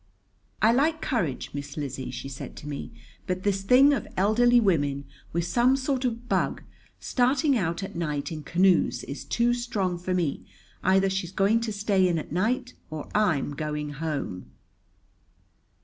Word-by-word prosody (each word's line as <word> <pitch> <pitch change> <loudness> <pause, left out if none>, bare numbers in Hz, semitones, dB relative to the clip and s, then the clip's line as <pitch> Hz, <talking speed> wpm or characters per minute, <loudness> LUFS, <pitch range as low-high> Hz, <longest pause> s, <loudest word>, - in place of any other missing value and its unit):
"I 225 +2 +6
like 310 +5 +2
courage, 160 - -2
Miss 145 +1 -6
Lizzie," 140 -3 -4
she - - -6
said 135 -2 -8
to 150 - -9
me; 145 -1 -5 0.4
"but 185 0 -2
this 195 -1 +1
thing 255 +8 +6
of - - -2
elderly 240 +5 +4
women, 145 -9 +1 0.3
with 170 0 -1
some 240 +9 +3
sort 265 -1 -1
of 240 0 -3
bug, - - 0 0.4
starting 265 +3 +2
out 180 -4 -1
at 195 - -7
night 150 -2 -2
in 155 -1 -5
canoes 180 +4 +2
is 140 - -6
too 240 +1 +1
strong 205 -7 -2
for 180 +1 -2
me. 170 -6 -1 0.4
Either 190 +1 +4
she's 190 -2 -2
going 200 +4 +3
to 230 -1 -2
stay 200 -2 +2
in 175 -2 +1
at 155 - -5
night 240 - 0 0.2
or 155 -2 -6
I'm 180 -10 +2
going 150 0 -3
home." 145 - -4
190 Hz, 165 wpm, -26 LUFS, 155-240 Hz, 0.4 s, I